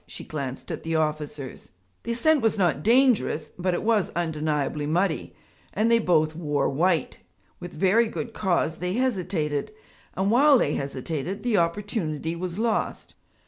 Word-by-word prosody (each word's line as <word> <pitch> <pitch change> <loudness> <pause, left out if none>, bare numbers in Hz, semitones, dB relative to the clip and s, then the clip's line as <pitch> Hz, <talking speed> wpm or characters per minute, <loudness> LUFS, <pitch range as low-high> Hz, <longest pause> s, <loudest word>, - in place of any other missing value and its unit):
She - - -8
glanced 135 -4 -5
at - - -4
the 165 0 -2
officers. 150 -3 -3 0.3
The 235 - -3
ascent 300 +5 +3
was 225 -1 +1
not 170 -8 +1
dangerous, 230 - +3
but 180 0 -1
it - - -3
was 220 -3 +2
undeniably 150 -3 -1
muddy, 170 +1 0 0.4
and 220 +3 +2
they 230 - +5
both 155 -6 +2
wore 150 -4 0
white; 165 +4 0 0.4
with 175 0 -7
very 195 +8 +3
good 225 +1 -5
cause 175 -5 0
they 180 +1 -2
hesitated. 185 - -1 0.4
And 195 +2 +1
while 280 +4 +6
they - - +1
hesitated, 150 +8 -4
the 240 -4 +2
opportunity 170 -3 -1
was 180 +1 -5
lost. 225 0 -1
175 Hz, 150 wpm, -25 LUFS, 155-215 Hz, 0.4 s, while